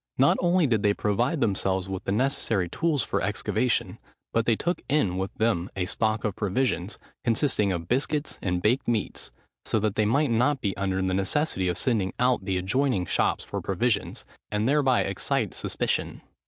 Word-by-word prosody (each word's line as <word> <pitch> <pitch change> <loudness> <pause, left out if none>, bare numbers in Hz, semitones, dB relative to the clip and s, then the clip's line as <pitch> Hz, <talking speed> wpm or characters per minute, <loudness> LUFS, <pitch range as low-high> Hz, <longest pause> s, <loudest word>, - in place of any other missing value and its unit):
Not 135 +2 +5
only 175 -1 +3
did 115 -6 +1
they 100 -1 +2
provide 120 +9 0
themselves 95 -2 0
with 95 -1 -5
the - - -1
necessary 110 -5 +1
tools 150 - 0
for - - -1
excavation, 125 -3 0 0.3
but 115 0 +1
they 115 - +4
took 175 +9 -2
in 120 -12 +2
with 95 +1 -2
them 110 -6 0
a 95 -2 -1
stock 110 +2 0
of 105 -3 -1
provisions, 105 -2 -1 0.3
consisting 115 -4 +1
of 85 -2 -3
biscuits 145 - -1
and 90 -2 -1
baked 120 +5 +2
meats, 115 -4 -2 0.3
so 110 - 0
that 105 -1 0
they 110 - +1
might 140 +5 +2
not 125 +5 +2
be 100 -6 -2
under 95 -1 -1
the 95 0 0
necessity 95 +1 0
of 90 - -1
sending 105 -7 0
out 125 0 +3
to 95 - -15
the 95 -1 0
adjoining 100 +1 +1
shops - - +1
for - - -5
provisions, - - -1 0.2
and 105 +2 0
thereby 135 -2 +3
excite 95 -1 -1
suspicion. - - -2
110 Hz, 180 wpm, -26 LUFS, 95-130 Hz, 0.3 s, Not